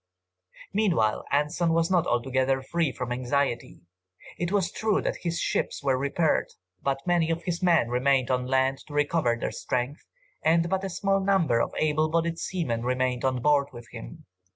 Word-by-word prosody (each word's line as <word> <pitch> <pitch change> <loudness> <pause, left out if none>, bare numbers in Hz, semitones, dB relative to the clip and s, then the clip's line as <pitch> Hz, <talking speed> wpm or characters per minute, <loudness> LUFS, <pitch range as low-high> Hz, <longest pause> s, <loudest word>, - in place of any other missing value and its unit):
Meanwhile 175 - +1
Anson 150 +4 +1
was 165 +2 +1
not 175 -2 +3
altogether 130 +2 +1
free 165 +1 0
from 125 -1 -5
anxiety. 130 +1 -1 0.6
It 175 0 -1
was 195 -4 +1
true 220 -2 +1
that - - -2
his 170 -1 -3
ships - - -1
were 135 -2 +2
repaired, 140 +4 +1 0.3
but 135 0 -2
many 175 -2 +2
of 165 0 -1
his 175 -1 -3
men 170 -8 +4
remained 130 +1 +2
on 125 0 0
land 130 0 +1
to 145 - -9
recover 145 -4 +2
their - - -2
strength, 125 +4 -3 0.4
and 165 +1 +3
but 190 0 0
a 195 - -2
small 195 +2 +1
number 190 -11 +2
of - - -2
able 155 0 +1
bodied 165 +1 0
seamen 135 -12 -2
remained 125 0 -1
on 130 -2 0
board 145 -2 +3
with 120 -1 -11
him. - - -10
145 Hz, 175 wpm, -27 LUFS, 130-170 Hz, 0.6 s, men